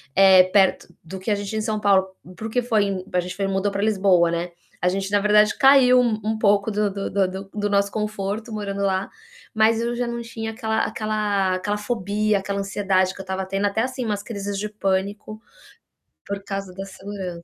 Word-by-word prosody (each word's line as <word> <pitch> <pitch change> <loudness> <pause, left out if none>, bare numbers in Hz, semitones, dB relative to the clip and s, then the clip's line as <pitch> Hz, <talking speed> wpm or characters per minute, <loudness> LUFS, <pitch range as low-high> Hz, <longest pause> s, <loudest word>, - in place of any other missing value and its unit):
eh, 190 -1 +7
perto 190 0 +2 0.2
do 175 +4 -8
que 200 +4 -3
a 205 - +3
gente 200 0 -5
tinha 220 - -2
em - - -1
São 215 -1 -2
Paulo, 195 -2 +3 0.3
para 220 - -8
o - - -7
que 245 +2 0
foi 200 -5 0
a 180 - +3
gente 180 +1 -7
foi 195 -1 -1
mudou 195 +1 0
para 200 - -2
Lisboa, 190 -5 +3
né. 170 +1 -3 0.3
A 180 - +3
gente 195 +1 -2
na 205 - +3
verdade 210 0 +4
caiu 265 -2 +6
um 220 -2 -1
pouco 205 0 +3
do 210 0 0
do 200 0 -4
do 195 -2 +2
do 190 +1 -8
do 205 -1 -2
nosso 200 0 +2
conforto 210 +1 -3
morando 200 -2 -4
lá, 190 0 0 0.4
mas 220 0 +3
eu 235 +1 -2
já 245 0 -1
não 235 0 -4
tinha 225 -1 -6
aquela 220 -1 -1
aquela 210 -3 -1
aquela 205 +3 -2
fobia, 210 -1 0
aquela 200 +1 -3
ansiedade 190 -2 0
que 195 - -9
eu - - -8
estava 190 0 -3
tendo, 195 +2 -1
até, 200 +2 0
assim, 255 0 -3
umas 205 -2 -2
crises 205 -2 -5
de 210 - -2
pânico, 205 +1 -3 0.9
por 200 0 -4
causa 195 -2 -5
da 195 +1 -6
segurança. 190 -3 -7
200 Hz, 215 wpm, -23 LUFS, 195-215 Hz, 0.9 s, eh